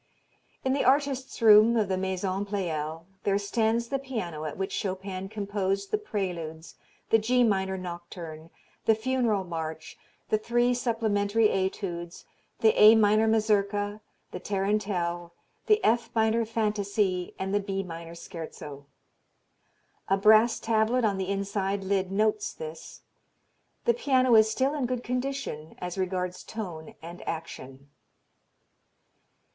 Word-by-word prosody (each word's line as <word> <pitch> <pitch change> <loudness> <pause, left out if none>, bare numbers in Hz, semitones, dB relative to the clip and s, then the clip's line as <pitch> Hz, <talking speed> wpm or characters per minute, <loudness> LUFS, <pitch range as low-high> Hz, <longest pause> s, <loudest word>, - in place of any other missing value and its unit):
In 260 - +2
the 280 - +1
artist's 270 0 +1
room 220 +2 +7
of 215 -3 +2
the 190 - 0
Maison 190 +1 -2
Pleyel 165 -5 -3 0.2
there 200 -1 +1
stands 225 +3 0
the 275 - -1
piano 190 - -5
at 150 - -5
which 195 +1 -3
Chopin 190 0 -4
composed 200 -2 -2
the 425 - +1
Preludes, 175 - -4 0.4
the 225 - +6
G 245 +3 +3
minor 190 -4 +1
nocturne, 170 -3 -8 0.4
the 220 - +5
Funeral 230 -3 0
March, 160 -3 -6 0.3
the 215 - +2
three 240 +2 +2
supplementary 225 -3 +1
etudes, 180 -2 -3 0.4
the 220 -1 +5
A 215 +2 +10
minor 215 0 +4
Mazurka, 205 -1 +1 0.3
the - - -5
Tarantelle, 190 -4 -1 0.3
the 425 -1 +5
F 235 +1 +2
minor 225 +1 +2
Fantasie 205 -4 -1
and 190 +1 -3
the 205 - +3
B 195 -1 -3
minor 165 -1 -8
Scherzo. 150 -4 -9 1.2
A 195 - +3
brass 220 +3 +5
tablet 225 +2 +2
on 200 -2 0
the 190 0 -2
inside 200 0 -1
lid 190 -1 0
notes 220 - +1
this. 475 -1 -9 0.8
The 235 - +4
piano 255 0 +2
is 220 -1 +7
still 265 +6 +1
in 280 -5 -1
good 250 -1 -3
condition 250 - -4
as 180 -1 -5
regards 185 -1 -2
tone 175 -8 -7
and 170 +2 -9
action. 140 -4 -7
200 Hz, 130 wpm, -27 LUFS, 185-225 Hz, 1.2 s, A